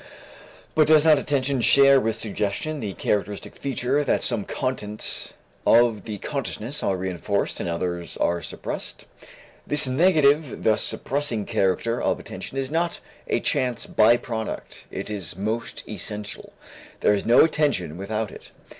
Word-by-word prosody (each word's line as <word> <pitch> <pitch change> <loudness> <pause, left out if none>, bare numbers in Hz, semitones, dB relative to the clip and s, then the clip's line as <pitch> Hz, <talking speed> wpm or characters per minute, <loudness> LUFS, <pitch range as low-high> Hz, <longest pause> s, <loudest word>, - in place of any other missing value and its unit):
But 155 -1 +4
does 155 0 +5
not 155 -3 +6
attention 135 -2 0
share 140 +2 +7
with 115 -1 -2
suggestion 110 +8 -2
the 105 -6 -4
characteristic 105 +1 -2
feature 135 +1 -1
that - - +1
some 115 -5 +1
contents 110 -5 -4 0.3
of 115 -3 +4 0.2
consciousness 140 -2 -3
are 95 - 0
reënforced 95 +2 -2
and - - -3
others 85 0 -3
are 85 0 0
suppressed? 80 - -6 0.6
This 145 -1 +6
negative, 150 -1 +3
this 110 -1 +3
suppressing 135 -7 -1
character 100 +5 0
of - - 0
attention 135 - -8
is 135 0 -2
not 170 +1 -1 0.3
a - - +1
chance 125 -3 0
by 115 +2 +4
product, 110 -2 -6
it 100 +2 -6
is 95 -7 -4
most 110 +4 -3
essential. 105 -1 -6 0.5
There - - +4
is 100 - 0
no 120 - +7
attention 145 - 0
without 105 +3 -3
it. - - -12
115 Hz, 140 wpm, -24 LUFS, 105-140 Hz, 0.6 s, share